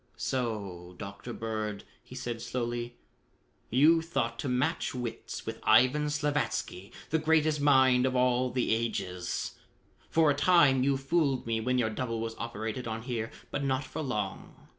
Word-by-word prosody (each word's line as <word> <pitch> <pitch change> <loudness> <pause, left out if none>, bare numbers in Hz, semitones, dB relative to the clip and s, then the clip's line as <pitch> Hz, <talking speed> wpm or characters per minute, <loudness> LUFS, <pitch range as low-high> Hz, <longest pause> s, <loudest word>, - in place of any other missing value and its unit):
"So, 100 -8 -3
Dr. 100 +3 -7
Bird," 110 -3 -4 0.2
he 125 - -12
said 120 -3 -4
slowly, 120 0 -3 0.7
"you 155 +7 +5
thought 130 -8 -2
to 135 - -2
match 130 +4 0
wits 120 -2 -5
with - - -5
Ivan 130 +7 +4
Slavatsky, 145 -10 -2 0.2
the 160 - +3
greatest 155 -1 +2
mind 130 -3 +5
of 130 - -1
all 125 0 +2
the 125 -2 +1
ages. 95 -6 -3 0.5
For 160 -2 +4
a - - 0
time 145 -4 +5
you 135 +1 +2
fooled 135 -1 +1
me 115 -1 0
when 125 +2 +1
your 110 -3 +1
double 115 0 -3
was 115 0 -3
operated 115 +1 -4
on 110 0 -4
here, 115 -3 -3 0.2
but 140 - -2
not 135 0 0
for 145 +4 -6
long. 105 -9 -5
125 Hz, 155 wpm, -30 LUFS, 115-140 Hz, 0.7 s, you